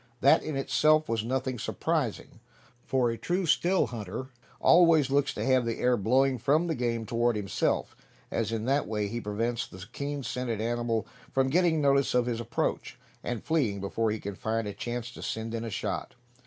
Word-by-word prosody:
That 140 Hz, -, +6 dB
in 155 Hz, -, -4 dB
itself 155 Hz, +3 st, +3 dB
was 115 Hz, -1 st, -1 dB
nothing 130 Hz, +1 st, -2 dB
surprising, -, -, -2 dB, 0.5 s
for 125 Hz, -3 st, +2 dB
a 115 Hz, -, -5 dB
true 180 Hz, +1 st, -1 dB
still 175 Hz, +3 st, +3 dB
hunter 115 Hz, +3 st, -6 dB, 0.3 s
always 165 Hz, -5 st, +5 dB
looks 140 Hz, 0 st, +2 dB
to -, -, -2 dB
have 130 Hz, -1 st, +3 dB
the 115 Hz, -1 st, -2 dB
air 125 Hz, 0 st, +3 dB
blowing 130 Hz, +4 st, +2 dB
from 145 Hz, +8 st, +2 dB
the 165 Hz, -, 0 dB
game 120 Hz, -4 st, -1 dB
toward 120 Hz, 0 st, +1 dB
himself, 100 Hz, -2 st, -1 dB, 0.4 s
as 115 Hz, -1 st, -1 dB
in 110 Hz, -1 st, -2 dB
that 140 Hz, +3 st, +1 dB
way 105 Hz, -1 st, -1 dB
he 120 Hz, +3 st, -4 dB
prevents 115 Hz, +3 st, -2 dB
the 95 Hz, 0 st, -10 dB
keen 140 Hz, 0 st, -4 dB
scented 120 Hz, -2 st, -3 dB
animal 115 Hz, 0 st, -1 dB, 0.3 s
from 135 Hz, 0 st, +1 dB
getting 170 Hz, -1 st, +3 dB
notice 140 Hz, -2 st, +3 dB
of 125 Hz, -1 st, +3 dB
his 120 Hz, -2 st, -2 dB
approach, -, -, -2 dB, 0.3 s
and 120 Hz, -3 st, -3 dB
fleeing 130 Hz, -12 st, 0 dB
before 110 Hz, +3 st, -1 dB
he 110 Hz, 0 st, -2 dB
can 100 Hz, 0 st, -5 dB
find 110 Hz, +3 st, -2 dB
a 100 Hz, -, -4 dB
chance 120 Hz, +2 st, -4 dB
to -, -, -11 dB
send 110 Hz, +1 st, -4 dB
in 115 Hz, 0 st, -3 dB
a 115 Hz, -, -4 dB
shot. 100 Hz, -, -4 dB
120 Hz, 190 wpm, -28 LUFS, 115-140 Hz, 0.5 s, That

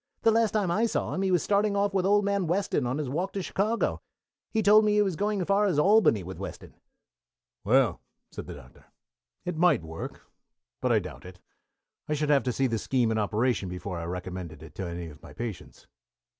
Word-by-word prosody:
"The 225 Hz, -, +5 dB
last 225 Hz, 0 st, +3 dB
time 205 Hz, -5 st, +1 dB
I 220 Hz, +6 st, +2 dB
saw -, -, -2 dB
him 185 Hz, -, -2 dB
he 195 Hz, -, +1 dB
was 180 Hz, -3 st, +2 dB
starting 205 Hz, 0 st, +2 dB
off 200 Hz, 0 st, +1 dB
with 190 Hz, -1 st, +1 dB
old 205 Hz, 0 st, +3 dB
man 200 Hz, -3 st, 0 dB
Weston 170 Hz, -7 st, 0 dB
on 130 Hz, +3 st, -1 dB
his 150 Hz, -3 st, -2 dB
walk 175 Hz, +9 st, -2 dB
to 195 Hz, -, -3 dB
Chicago. 215 Hz, +6 st, -1 dB, 0.5 s
He 220 Hz, -1 st, 0 dB
told 210 Hz, +2 st, +7 dB
me 210 Hz, -1 st, +2 dB
he 210 Hz, -, +4 dB
was 190 Hz, -4 st, -1 dB
going 205 Hz, +3 st, -1 dB
as -, -, -1 dB
far 200 Hz, +2 st, +3 dB
as 175 Hz, -7 st, 0 dB
Albany 185 Hz, -, +4 dB
with 90 Hz, 0 st, -8 dB
Weston." 100 Hz, -, -8 dB, 0.9 s
"Well," 120 Hz, -1 st, +3 dB, 0.3 s
said -, -, -8 dB
the -, -, -7 dB
Doctor, -, -, -16 dB, 0.6 s
"it 180 Hz, -2 st, -3 dB
might 160 Hz, -, +3 dB
work, 80 Hz, 0 st, -7 dB, 0.6 s
but -, -, +1 dB
I -, -, +5 dB
doubt 60 Hz, -, -5 dB
it. 90 Hz, 0 st, -12 dB, 0.7 s
I 150 Hz, -, +1 dB
should 150 Hz, 0 st, -1 dB
have 140 Hz, -2 st, +5 dB
to 125 Hz, -, +1 dB
see 135 Hz, +3 st, 0 dB
the 115 Hz, -3 st, 0 dB
scheme 120 Hz, -2 st, +1 dB
in 110 Hz, -, 0 dB
operation 105 Hz, -1 st, 0 dB
before 90 Hz, 0 st, -5 dB
I 85 Hz, -, -5 dB
recommended 90 Hz, -3 st, -6 dB
it 75 Hz, -2 st, -12 dB
to 95 Hz, +2 st, -5 dB
any 85 Hz, 0 st, -5 dB
of 75 Hz, -2 st, -13 dB
my -, -, -12 dB
patients." 115 Hz, -4 st, -7 dB
150 Hz, 220 wpm, -27 LUFS, -, 0.9 s, told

